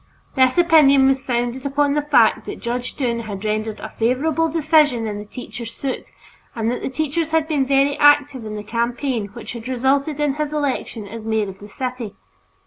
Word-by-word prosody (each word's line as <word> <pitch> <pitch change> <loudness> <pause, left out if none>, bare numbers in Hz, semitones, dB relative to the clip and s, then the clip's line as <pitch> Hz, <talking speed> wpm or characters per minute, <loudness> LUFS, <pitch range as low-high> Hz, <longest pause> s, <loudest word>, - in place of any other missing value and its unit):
This 260 +1 +3
opinion 305 -6 +6
was 270 0 +1
founded 245 0 -2
upon 280 0 +1
the 295 - +1
fact 235 -7 +3
that - - -6
Judge 245 +1 -4
Dunne 240 -4 -1
had 210 -3 -6
rendered 215 0 -2
a - - -7
favorable 285 +8 +1
decision 300 -6 +3
in 205 -1 -4
the 210 - -8
teachers' 235 +1 -7
suit 270 -2 -4 0.5
and 225 0 0
that 245 - -3
the - - -3
teachers 310 +3 -1
had 320 -1 +1
been 285 -4 0
very 275 +1 +3
active 290 -3 +4
in 215 -1 -6
the 210 - -6
campaign 235 0 -2
which 230 +4 -9
had 235 0 -8
resulted 275 +4 0
in 295 -2 +1
his 300 0 -3
election 275 -7 -2
as 225 +2 -8
mayor 220 -2 0
of 190 0 -11
the 205 - -11
city. 250 -2 -5
260 Hz, 195 wpm, -21 LUFS, 230-290 Hz, 0.5 s, opinion